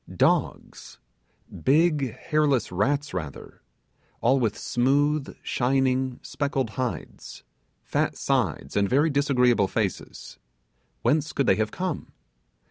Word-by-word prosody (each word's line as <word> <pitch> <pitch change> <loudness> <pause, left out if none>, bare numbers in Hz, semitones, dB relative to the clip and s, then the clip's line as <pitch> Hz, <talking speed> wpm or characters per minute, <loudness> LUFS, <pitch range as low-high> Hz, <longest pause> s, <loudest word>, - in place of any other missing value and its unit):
Dogs! - - 0 0.7
Big 145 -4 +2
hairless 150 -6 +1
rats 140 +11 0
rather; 80 -7 -7 0.6
all 130 +3 +3
with 115 -4 0
smooth, 140 +4 0
shining 130 0 0
speckled 140 -4 -2
hides 125 -1 -5 0.4
fat - - -1
sides, 65 - -1
and 100 -1 +2
very 145 +4 +3
disagreeable 125 -7 +3
faces. - - -4 0.6
Whence 155 +1 +1
could 140 - +1
they - - +3
have 110 0 0
come? 180 +9 -4
135 Hz, 105 wpm, -25 LUFS, 120-145 Hz, 0.7 s, all